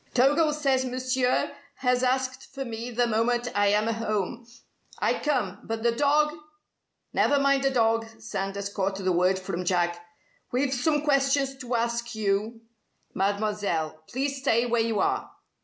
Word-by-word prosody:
"Togo 290 +5 +4
says 275 -3 +1
Monsieur 255 0 0 0.2
has 250 -1 +1
asked 260 0 -1
for 270 -1 -3
me 230 0 -5
the 245 0 +1
moment 240 +2 0
I 205 0 +3
am 210 +1 +3
home. 225 0 -2 0.5
I - - +1
come. 230 -10 -1
But 225 0 -4
the 235 - +4
dog 295 +4 +2 0.4
" - - -53
"Never 285 - +3
mind 275 0 +3
the - - +5
dog!" 225 -3 +2
Sanders 200 -2 -3
caught 195 -1 -1
the 190 -1 0
word 180 +2 +3
from 180 -1 -4
Jack. 175 -1 0 0.5
"We've 260 +2 +1
some 295 +4 +1
questions 275 -1 +2
to 250 -2 -3
ask 235 0 -1
you, 215 +2 -1 0.5
Mademoiselle. 200 -6 -1
Please 275 +2 -2
stay 235 -3 +2
where 235 -1 +1
you 225 -2 0
are." - - 0
235 Hz, 155 wpm, -27 LUFS, 205-265 Hz, 0.5 s, the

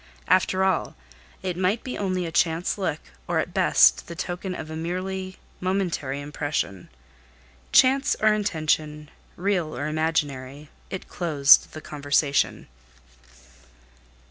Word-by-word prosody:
After 185 +1 +3
all 190 -3 0 0.5
it 185 -2 -2
might 190 +5 0
be 255 - -5
only 185 -2 -1
a 165 - -5
chance 165 0 +1
look, 185 -6 -2 0.3
or - - 0
at - - -1
best - - +4
the 170 - -7
token 180 +2 -4
of 155 -2 -7
a - - -5
merely 185 +3 -4 0.2
momentary 180 -7 -2
impression. 145 - -3 0.8
Chance 270 +1 +4
or 215 0 +4
intentional 155 -6 -1 0.2
real 180 -4 -1
or 145 - -2
imaginary, 150 -3 -2 0.2
it 190 - -6
closed 150 -5 +4
the 155 - -8
conversation. 145 -1 0
170 Hz, 120 wpm, -25 LUFS, 150-185 Hz, 0.8 s, best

